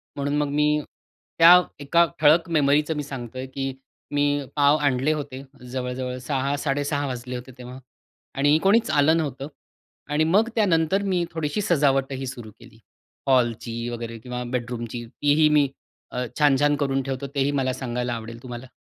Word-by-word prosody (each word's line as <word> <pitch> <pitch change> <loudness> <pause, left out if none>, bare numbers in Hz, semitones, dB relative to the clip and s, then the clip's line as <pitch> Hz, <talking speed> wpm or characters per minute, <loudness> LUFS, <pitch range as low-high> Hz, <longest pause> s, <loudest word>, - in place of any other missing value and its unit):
म्हणून 140 +1 -2
मग 150 -1 +1
मी 150 +1 +2 0.7
त्या 175 +2 +9 0.2
एका 170 +4 +3
ठळक 160 +3 +5
मेमरीचं 150 0 +2
मी 150 - -3
सांगतोय, 130 -2 -7
की 135 0 -4 0.4
मी 145 0 +1
पाव 145 +1 +4
आणले 140 0 +1
होते. 140 -3 -6 0.3
जवळ-जवळ 125 0 -3
6-6:30 145 +1 -1
वाजले 125 -1 -5
होते 125 +2 -8
तेव्हा 125 +1 -9 0.6
आणि 145 +2 +4
कोणीच 220 +4 +3
आलं 155 +2 +4
नव्हतं. 140 -3 -3 0.6
आणि 150 +2 +2
मग 205 +8 +3
त्यानंतर 190 -2 +2
मी 185 -3 0
थोडीशी 160 +4 -2
सजावटही 135 -7 +1
सुरू 120 -4 -8
केली - - -16 0.5
हॉलची 120 -2 0
वगैरे 115 -1 -6
किंवा 125 +2 -5
बेडरूमची. 120 -1 -4
तीही 145 +5 +2
मी 145 -2 +3 0.4
अ, 125 0 -2
छान-छान 145 0 +4
करून 135 -1 +1
ठेवतो. 135 +1 -4
तेही 140 +1 +1
मला 135 -2 0
सांगायला 125 -1 -3
आवडेल 115 0 -7
तुम्हाला. 120 0 -8
140 Hz, 145 wpm, -24 LUFS, 125-150 Hz, 0.7 s, त्या